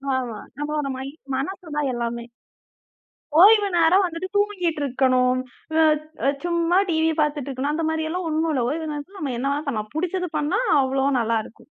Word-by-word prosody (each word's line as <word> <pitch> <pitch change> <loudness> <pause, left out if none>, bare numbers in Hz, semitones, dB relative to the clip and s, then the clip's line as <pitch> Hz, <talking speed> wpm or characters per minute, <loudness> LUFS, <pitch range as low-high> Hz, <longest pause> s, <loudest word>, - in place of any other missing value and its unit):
ஆமா. 240 -5 -3 0.2
நம்மளோட 295 -1 -2
மை 265 - -5 0.3
மனசுதான் 295 -2 -3
எல்லாமே. 235 0 -3 1.1
ஓய்வு 415 +1 +7
நேரம் 345 +4 +5
வந்துட்டு, 345 +1 -4
தூங்கிட்டு 365 -7 0
இருக்கணும். 255 -1 +2 0.4
அ 310 -2 +1
சும்மா 340 0 +1
டிவி 320 -1 +2
பாத்துட்டு 295 -2 -1
இருக்கணும். 275 +3 -2
அந்த 325 0 -1
மாரியெல்லாம் 320 +3 -2
ஒண்ணும் 315 +1 0
இல்ல! 255 - +1
ஓய்வு 315 +2 -3
நேரத்துல 300 +7 -7
நம்ம 280 -6 -3
என்ன 275 +3 -1
வேணா 305 - -5
பண்ணலாம். 215 -5 -3
புடிச்சதை 360 +1 -1
பண்ணா, 295 +8 0 0.2
அவ்ளோ 265 +1 0
நல்லா 230 0 +1
இருக்கும். - - -16
305 Hz, 155 wpm, -23 LUFS, 265-335 Hz, 1.1 s, ஓய்வு